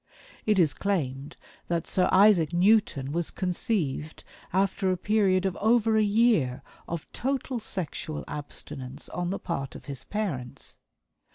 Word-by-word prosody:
It 210 -2 +4
is 160 -6 +4
claimed 145 -8 -2 0.3
that 170 -1 -1
Sir 180 -1 +2
Isaac 185 -5 +5
Newton 175 -7 +3
was 170 +1 -1
conceived 175 -5 -2 0.3
after 190 +1 +1
a 185 - 0
period 195 -1 +2
of 190 -2 0
over 225 0 +3
a 220 - +4
year 205 - +2 0.2
of 170 -2 -4
total 265 0 -2
sexual 170 -7 -4
abstinence 140 -2 -5
on 175 0 -3
the 195 - -1
part 140 -6 -4
of - - -10
his 140 -3 -5
parents. 160 - -4
180 Hz, 140 wpm, -27 LUFS, 150-210 Hz, 0.3 s, Isaac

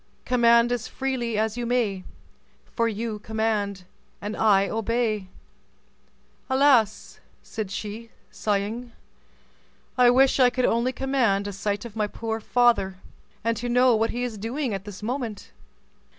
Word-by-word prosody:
Command 235 -1 +4
as 245 -2 -2
freely 250 -4 -2
as 220 +1 0
you 240 - -2
may, 220 -6 0 0.7
For 230 -1 +2
you 220 0 -4
command 210 -3 -2 0.4
and 205 +1 -5
I 200 -3 +4
obey." 225 -2 -1 1.2
"Alas!" 260 -6 +3 0.2
said 215 -4 -5
she, 215 +3 -6 0.2
sighing; 215 +4 -2 1.1
"I 245 -1 +7
wish 265 +2 +4
I 250 -1 +6
could 250 0 0
only 235 +3 +1
command 255 -7 +1
a 205 - -4
sight 205 +2 -3
of 230 -2 -9
my 210 -1 0
poor 225 +1 -4
father, 225 -5 +2 0.5
and 230 +1 +1
to 245 +3 -3
know 250 0 +4
what 225 +1 +1
he 245 +1 -3
is 230 -4 -4
doing 240 +3 -2
at 195 0 -5
this 205 0 -9
moment." 235 - -4
225 Hz, 140 wpm, -25 LUFS, 210-245 Hz, 1.2 s, I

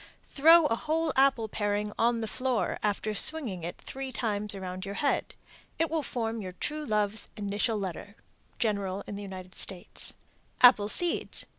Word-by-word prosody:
Throw 325 +3 +7
a 230 - +2
whole 315 +3 -1
apple 265 -4 +3
paring 205 0 -1
on 235 0 +2
the 220 - -2
floor, 255 +1 -1
after 210 +1 -1
swinging 220 - +3
it 170 - -5
three 270 0 -6
times 210 -4 -2
around 185 -1 -6
your 200 0 -5
head. 285 +4 0 0.4
It 325 -1 0
will 325 -1 +1
form 230 -4 -3
your 185 -2 -6
true 300 +11 -3
love's 210 -2 0
initial 210 +2 -1
letter. 200 +1 -5 0.4
General 200 -3 -1
in 205 - -6
the 200 - -6
United 185 -2 -8
States. 185 0 -4 0.5
APPLE 245 -5 +7
SEEDS. 350 +8 0
215 Hz, 160 wpm, -29 LUFS, 200-265 Hz, 0.5 s, Throw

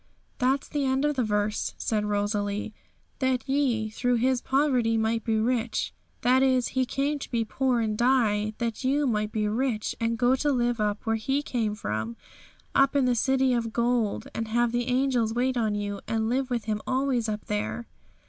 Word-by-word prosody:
'That's 265 +2 +1
the 290 -1 -2
end 265 +1 +1
of 295 0 +1
the 255 - +1
verse,'said 210 0 -1
Rosalie. 205 0 -1 0.5
'"That 260 -1 0
ye 255 -6 +1
through 245 +3 +1
His 250 +1 +1
poverty 255 -5 +2
might 225 0 0
be 225 -2 +1
rich." 230 0 0 0.3
That 255 +2 +4
is, 260 -2 +3
He 260 -1 0
came 285 +3 -1
to - - -7
be 230 -2 0
poor 255 +1 0
and 215 -1 -1
die, 215 -3 +2
that 230 +1 -3
you 280 +3 +2
might 210 -4 0
be 215 -1 0
rich 225 0 -1
and 230 0 0
go 245 +3 +3
to 290 +2 +1
live 240 -2 +1
up 210 -1 -1
where 225 0 +1
He 270 +6 -1
came 225 -6 -1
from, 110 - -4 0.6
up 275 +1 +3
in 275 -2 +3
the 250 - +3
City 265 +2 +2
of 230 -2 -1
Gold, 235 -3 0
and 225 - -3
have 240 +1 +1
the 240 0 -1
angels 250 -3 +1
wait 255 +1 +1
on 220 -3 0
you, 205 -1 -3
and 220 -1 0
live 260 +2 0
with 240 -3 -2
Him 215 -1 -2
always 255 -3 0
up 210 0 -4
there.' 210 +3 -3
235 Hz, 190 wpm, -27 LUFS, 215-260 Hz, 0.6 s, That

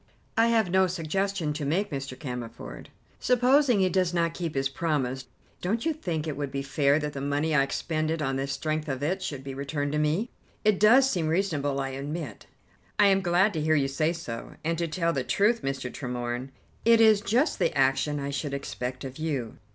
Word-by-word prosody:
"I 225 +1 +4
have 225 -6 +2
no 190 0 +4
suggestion 180 -1 -1
to 150 0 -4
make, 175 +8 0
Mr. 135 -2 -5
Cammerford." 125 -5 -7 0.3
"Supposing 250 -2 +4
he 185 - +3
does 185 -1 +1
not 170 -1 +1
keep 165 -4 -4
his 135 0 +1
promise, 135 -4 -2 0.3
don't 220 - -1
you 325 - +2
think 170 - -3
it 155 -3 -3
would 145 -1 -3
be 140 0 -3
fair 140 +1 +2
that 150 -1 -3
the 135 - -5
money 145 +3 0
I 145 - +5
expended 155 +3 -1
on 135 -3 -1
the 135 +1 -2
strength 155 +2 -2
of 135 0 -3
it 185 +6 0
should 140 -7 -4
be 135 0 -6
returned 140 +1 -3
to 150 - 0
me?" 160 +10 0 0.3
"It 215 -3 +4
does 250 +6 +6
seem 175 -11 0
reasonable, 155 -5 0
I 135 0 -2
admit." 145 +3 -6 0.5
"I 205 - +6
am 195 0 +3
glad 185 +3 +3
to 160 - -2
hear 155 +1 +3
you 140 -2 +2
say 155 +4 0
so, 145 -9 -6
and 165 +2 0
to 170 - 0
tell 170 +1 0
the 135 - -1
truth, 205 - +2
Mr. 135 -2 -3
Tremorne, 125 0 -4 0.3
it 230 0 +6
is 220 -2 +6
just 235 +9 +1
the - - +1
action 135 +2 +2
I 140 0 -3
should 140 0 -3
expect 125 -2 -5
of 135 +2 -7
you." 140 -8 -3
155 Hz, 205 wpm, -27 LUFS, 135-185 Hz, 0.5 s, does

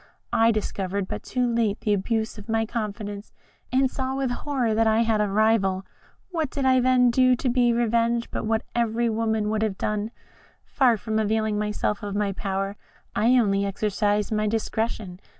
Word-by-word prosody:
I 225 0 +4
discovered 200 -2 -2
but - - -5
too 250 -1 -1
late 230 -3 0
the 210 - +1
abuse 220 +2 -1
of 210 - -13
my 225 0 +1
confidence, 210 -2 -5 0.4
and 260 +1 +2
saw 265 0 -3
with 270 -2 -1
horror 245 -3 -1
that 225 +1 +2
I 220 +1 +3
had 220 -2 +1
a 210 - +1
rival. 195 -2 +2 0.5
What 320 -5 -1
did 275 0 -3
I 260 -1 +5
then 250 -1 +4
do 255 +1 +4
to 250 - -3
be 245 -1 +3
revenged, 235 0 +1
but - - -3
what 220 0 +1
every 235 0 +1
woman 220 -1 0
would 220 0 0
have 215 -3 -1
done? 210 0 -2 0.6
Far 250 -5 +3
from 220 +1 -2
availing 220 0 0
myself 210 0 -1
of 205 -1 -5
my 205 -1 0
power, 195 +1 -3 0.4
I 240 +4 +4
only 200 -4 +2
exercised 205 +1 0
my 215 0 +1
discretion. 220 -3 -2
220 Hz, 180 wpm, -25 LUFS, 210-235 Hz, 0.6 s, I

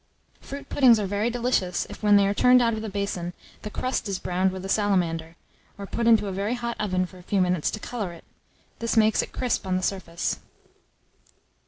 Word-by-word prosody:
Fruit 280 +1 -8
puddings 250 -5 +5
are 205 - -1
very 205 +4 0
delicious 235 -7 0
if, - - -10
when 210 -1 +5
they 200 -1 +5
are 200 - +1
turned 250 +4 +5
out 230 -1 +2
of 220 - -3
the 220 - -4
basin, 195 -3 -3 0.3
the 210 - -5
crust 255 -1 -2
is 195 - -1
browned 185 +1 0
with 190 0 -7
a - - -3
salamander, 175 -6 0 0.4
or 200 - -6
put 230 +4 -2
into 225 -2 +5
a 195 - -3
very 200 +5 -1
hot 235 -1 -3
oven 185 -3 0
for 185 0 -13
a - - -12
few 195 +2 -1
minutes 180 -3 +1
to 215 - -5
colour 210 -5 -4
it: 170 - -13 0.6
this 230 0 -1
makes 220 0 +4
it - - -7
crisp 245 -6 -1
on 185 - +1
the 185 - -3
surface. 170 -3 -2
200 Hz, 215 wpm, -25 LUFS, 185-230 Hz, 0.6 s, puddings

